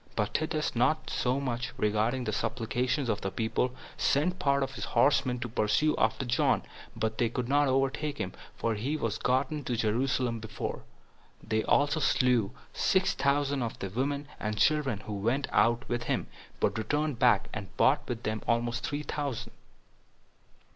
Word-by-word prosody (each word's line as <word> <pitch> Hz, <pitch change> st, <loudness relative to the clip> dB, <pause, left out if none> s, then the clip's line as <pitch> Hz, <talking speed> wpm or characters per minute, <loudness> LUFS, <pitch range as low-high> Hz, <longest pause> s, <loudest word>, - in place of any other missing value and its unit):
But 105 Hz, -2 st, -1 dB
Titus, 155 Hz, -2 st, -1 dB
not 155 Hz, +7 st, +1 dB
so 125 Hz, +2 st, +1 dB
much 120 Hz, -3 st, -3 dB
regarding 110 Hz, +5 st, +1 dB
the 110 Hz, -, -2 dB
supplications 120 Hz, +5 st, -1 dB
of 105 Hz, -2 st, -1 dB
the 95 Hz, -, -1 dB
people, 115 Hz, +5 st, -1 dB, 0.2 s
sent 180 Hz, +6 st, +1 dB
part 140 Hz, 0 st, +2 dB
of 135 Hz, 0 st, -4 dB
his 110 Hz, -5 st, -6 dB
horsemen 130 Hz, -3 st, +2 dB
to -, -, -2 dB
pursue 120 Hz, +7 st, +2 dB
after 130 Hz, -, +1 dB
John, 120 Hz, 0 st, +2 dB, 0.3 s
but 110 Hz, 0 st, -2 dB
they 120 Hz, -, +3 dB
could 120 Hz, +1 st, -3 dB
not 145 Hz, +2 st, +3 dB
overtake 135 Hz, +2 st, 0 dB
him, -, -, -3 dB, 0.2 s
for 115 Hz, -, 0 dB
he 130 Hz, +9 st, -2 dB
was 115 Hz, -7 st, -2 dB
gotten 135 Hz, +4 st, 0 dB
to 120 Hz, -, -1 dB
Jerusalem 120 Hz, +1 st, 0 dB
before; 110 Hz, 0 st, -5 dB, 0.6 s
they 110 Hz, 0 st, 0 dB
also 145 Hz, +2 st, +3 dB
slew 125 Hz, -8 st, +3 dB, 0.2 s
six 190 Hz, 0 st, +2 dB
thousand 140 Hz, -1 st, +1 dB
of 115 Hz, -2 st, -3 dB
the 95 Hz, -, -5 dB
women 140 Hz, +5 st, -1 dB
and 105 Hz, 0 st, -2 dB
children 135 Hz, -2 st, +2 dB
who 105 Hz, -, -6 dB
went 115 Hz, +8 st, 0 dB
out 120 Hz, +1 st, +3 dB
with 120 Hz, 0 st, -2 dB
him, -, -, 0 dB, 0.3 s
but 110 Hz, -, +1 dB
returned 145 Hz, +3 st, -1 dB
back, -, -, +4 dB
and 100 Hz, -2 st, -7 dB
brought 135 Hz, +3 st, +4 dB
with 120 Hz, -1 st, -3 dB
them 110 Hz, 0 st, -2 dB
almost 120 Hz, 0 st, 0 dB
three 145 Hz, +1 st, -2 dB
thousand. 140 Hz, -5 st, -3 dB
125 Hz, 170 wpm, -29 LUFS, 110-140 Hz, 0.6 s, back